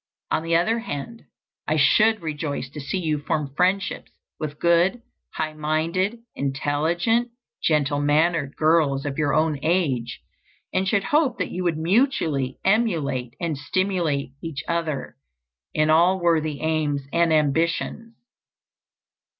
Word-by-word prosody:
On - - +1
the 165 +1 0
other 220 +8 +2
hand, 230 +3 -6 0.4
I 155 - +1
should 215 +6 +4
rejoice 150 -4 -4
to 150 - -7
see 140 +8 -3
you 155 -4 -1
form 145 -2 -2
friendships 185 +3 0 0.3
with 150 -1 -4
good, 175 +7 +3 0.3
high 155 -1 -2
minded, 165 +8 -1
intelligent, 160 - 0 0.3
gentle 145 -2 +1
mannered 150 0 +1
girls 155 -3 +2
of 145 +1 -3
your 150 -1 +1
own 155 -2 +1
age, 150 -8 0 0.5
and 190 +1 +1
should 200 0 +2
hope 295 -5 +2
that - - -3
you 185 - -3
would 165 -3 +1
mutually 160 - +1
emulate 160 - +1
and 165 -3 -1
stimulate 160 -3 -1
each 155 -6 -5
other 165 - -2 0.5
in 155 0 +2
all 175 +4 +4
worthy 155 -4 +1
aims 155 -3 0
and 170 -1 +3
ambitions. 165 +9 0
160 Hz, 130 wpm, -23 LUFS, 145-185 Hz, 0.5 s, should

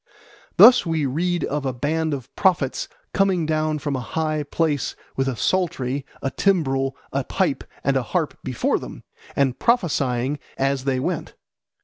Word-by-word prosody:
Thus 250 0 +9
we 160 -3 0
read 170 +6 0
of 145 0 -2
a 130 -1 -1
band 155 +5 -1
of 135 -1 -10
prophets 170 -9 +1 0.3
coming 190 -4 +2
down 155 0 0
from 145 -1 -2
a - - -1
high 155 +4 -1
place 150 -1 -1 0.2
with 135 0 0
a 130 - -1
psaltery, 140 - -1 0.2
a 135 - 0
timbrel, 135 -9 +1 0.2
a 135 0 0
pipe, 165 0 0 0.2
and 140 - +2
a 135 - +3
harp 170 -5 0
before 130 -3 0
them, - - -9 0.3
and 135 -3 +1
prophesying 145 - +1 0.2
as 135 0 0
they 130 -2 +1
went. - - -3
145 Hz, 155 wpm, -23 LUFS, 135-165 Hz, 0.3 s, Thus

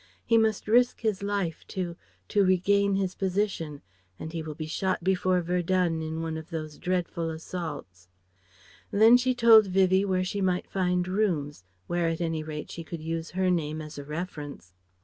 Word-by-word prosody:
He 230 - +3
must 220 -2 +2
risk 245 +3 +3
his 215 -4 0
life 200 -5 -2
to 175 -3 -4 0.3
to 205 - +3
regain 200 +2 +3
his 190 -1 -1
position, 185 -6 -2 0.3
and 160 - -7
he 165 - -3
will 155 -1 -6
be 155 - -5
shot 185 +3 -1
before 185 -1 +2
Verdun 175 -1 0
in 160 +1 -4
one 160 -1 -3
of 160 0 -9
those 155 -3 -6
dreadful 175 -2 -1
assaults." 160 - -7 0.8
Then 220 +4 +6
she 250 +1 +2
told 225 -3 +7
Vivie 190 0 +3
where 185 -2 +1
she 195 +2 -3
might 180 -1 +1
find 180 -1 0
rooms, 170 - -1 0.2
where 175 -1 0
at 165 - -3
any 165 -2 -1
rate 155 -1 -6
she 165 - -6
could 165 -1 -7
use 165 0 -3
her 185 -1 +3
name 155 -3 -1
as 150 -1 -8
a - - -6
reference. 150 - -7
180 Hz, 175 wpm, -27 LUFS, 160-195 Hz, 0.8 s, told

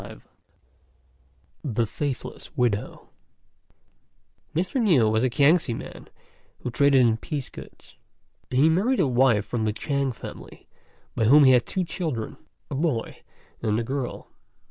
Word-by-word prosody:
LXVIII. - - -11 1.4
THE 120 -4 0
FAITHLESS 140 +5 -5
WIDOW. 115 -5 -1 1.5
Mr. 185 - 0
Niu 160 - +4
was 110 +2 +1
a 130 - +2
Kiangsi 140 0 +3
man - - -10 0.5
who 125 - -4
traded 140 +1 +4
in 115 -2 +3
piece 140 +3 -5
goods. - - -14 0.5
He 130 +4 +3
married 200 +11 +2
a 180 - +4
wife 120 -5 +3
from 115 -3 -2
the 105 - 0
Chêng 140 +3 -1
family, 115 - -11 0.5
by 110 - 0
whom 145 +6 +7
he 130 - +7
had 125 -2 +3
two 185 - -1
children, 155 - -4 0.3
a - - -3
boy 140 -5 -2 0.4
and 110 -1 0
a - - -1
girl. 130 +1 -5
130 Hz, 140 wpm, -25 LUFS, 115-150 Hz, 1.5 s, whom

